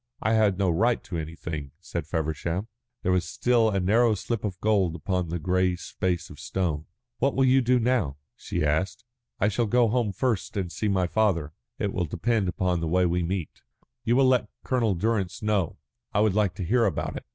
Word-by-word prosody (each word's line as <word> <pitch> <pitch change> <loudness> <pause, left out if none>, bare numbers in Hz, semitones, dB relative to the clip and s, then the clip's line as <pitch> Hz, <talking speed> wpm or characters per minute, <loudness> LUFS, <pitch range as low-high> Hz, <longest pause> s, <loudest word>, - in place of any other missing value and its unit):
"I 110 - +1
had 105 -4 +3
no 95 -3 +2
right 115 +8 +2
to 90 -5 -5
anything," 80 -3 -6
said - - -5
Feversham. 80 +5 -2 0.4
There 90 - +2
was 90 -1 +2
still 115 +5 +2
a 100 -2 0
narrow 110 +4 +3
slip 115 +2 -3
of 95 -4 -3
gold 100 -6 +2
upon 90 +1 -2
the 85 - -2
grey 90 +2 +1
space 90 0 -3
of 75 - -12
stone. 80 +1 -2 0.3
"What 135 +3 +1
will 135 - +4
you 130 +1 +5
do 125 +1 +3
now?" 115 - +1 0.2
she - - -2
asked. 95 +9 -1 0.3
"I 100 - +3
shall 110 +2 +1
go 120 +1 +3
home 120 -2 +1
first 110 0 -1
and 90 -3 -2
see 110 - -2
my 95 -3 +2
father. 85 -6 +1 0.2
It 100 -2 -2
will 90 - 0
depend 110 +5 0
upon 90 -1 0
the 80 - -2
way 90 +3 +3
we 90 +1 +1
meet." 85 -1 -3 0.4
"You 120 0 +2
will 135 +1 +5
let 125 -5 +2
Colonel 115 -6 +1
Durrance 100 0 -1
know. 105 -5 0 0.4
I 105 - +4
would 110 -3 +3
like 100 -3 +1
to 100 - -4
hear 115 +6 +3
about 100 - -1
it." - - -7
95 Hz, 205 wpm, -26 LUFS, 85-110 Hz, 0.4 s, you